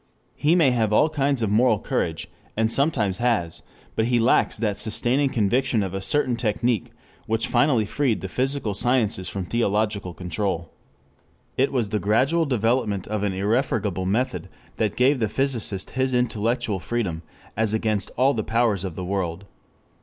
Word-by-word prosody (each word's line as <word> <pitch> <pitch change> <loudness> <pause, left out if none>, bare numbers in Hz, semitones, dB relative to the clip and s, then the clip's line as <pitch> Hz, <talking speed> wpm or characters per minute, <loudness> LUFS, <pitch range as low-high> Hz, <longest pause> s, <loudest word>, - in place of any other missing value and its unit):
He 155 +4 +2
may 160 -7 +4
have 115 -4 +1
all 130 +9 +4
kinds 140 -4 0
of 105 - 0
moral 110 +1 +4
courage, - - -2 0.3
and 110 0 +2
sometimes 115 - +1
has, 110 -9 0 0.3
but 110 - +1
he 120 +1 +2
lacks 115 +2 +3
that 105 -3 -1
sustaining 125 +5 +1
conviction 120 0 +1
of 95 -1 -4
a 95 - -3
certain 130 +2 +1
technic 115 -1 0 0.4
which 110 +1 0
finally 120 -2 +2
freed 125 +1 0
the 95 - -4
physical 130 -1 -1
sciences 110 -4 0
from 95 -2 -4
theological 105 -3 -1
control. 90 -1 -3 0.8
It 135 +2 +2
was 120 -6 0
the 105 - -1
gradual 135 +11 +2
development 115 -5 0
of 105 -1 -2
an 100 -2 0
irrefragable 100 -2 0
method 125 +6 -1 0.3
that 105 -3 0
gave 130 +2 +3
the 110 -3 0
physicist 115 -8 -1
his 130 0 0
intellectual 115 -3 0
freedom 95 -6 -2 0.3
as 110 -1 +1
against 110 -3 -1
all 135 +3 +4
the 110 - -2
powers 110 -4 +1
of 95 -4 -5
the 90 - -5
world. 95 -1 -3
110 Hz, 160 wpm, -24 LUFS, 100-125 Hz, 0.8 s, may